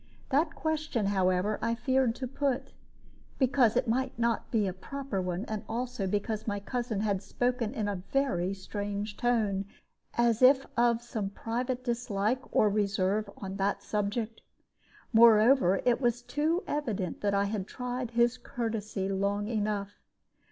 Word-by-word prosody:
That 295 +5 +2
question, 310 -8 -1
however, 190 +1 +1
I 230 0 0
feared 260 0 +1
to 255 - -4
put, 270 0 -2 0.6
because 255 -4 +3
it 250 0 +1
might 255 +2 0
not 235 -1 0
be 220 -3 +2
a 190 - -1
proper 245 +2 -4
one, 180 +3 -3
and 215 -3 -4
also 235 -3 -2
because 210 +3 -2
my 205 -1 -1
cousin 230 0 -2
had 200 -3 0
spoken 245 +3 -1
in 215 -4 -1
a 200 -3 -2
very 195 -10 +1
strange 205 +1 -4
tone, 215 -5 +1 0.5
as 235 -1 +2
if 265 +1 +6
of 235 0 +3
some 215 -4 -3
private 245 +4 -3
dislike 235 -1 0
or 215 - +4
reserve 205 0 +1
on 195 0 -6
that 200 +1 0
subject. 215 +2 -2 0.7
Moreover, 225 -3 +6
it 245 +1 +3
was 240 -1 +1
too 315 +7 0
evident 215 - -2
that 200 -1 +1
I 200 - +3
had 200 -1 -3
tried 250 -1 -4
his 240 +1 +2
courtesy 220 -5 -3
long 200 +1 0
enough. 210 -2 -2
225 Hz, 150 wpm, -30 LUFS, 200-245 Hz, 0.7 s, if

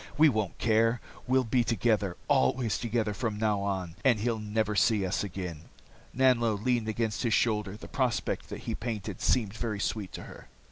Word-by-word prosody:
We 155 +1 +7
won't 110 -7 -1
care. 115 +1 +2 0.3
We'll 130 +1 +3
be 120 +1 +2
together, 110 -4 +1
always 110 - +2
together 115 -2 -1
from 110 -1 -2
now 105 -2 +1
on, 95 -4 -3
and 120 -5 +4
he'll 115 0 0
never 105 0 -1
see 105 -1 +3
us 95 - -1
again." 90 -5 -6 0.5
Nanlo 120 -3 +3
leaned 115 +2 0
against 110 0 -1
his 115 -3 +2
shoulder, 105 -4 0
the - - -10
prospect 125 -4 -1
that - - -6
he - - -3
painted 105 -4 -4
seemed 110 -6 +2
very 110 -2 -3
sweet 100 -3 -2
to - - -6
her. - - -12
110 Hz, 180 wpm, -29 LUFS, 100-120 Hz, 0.5 s, We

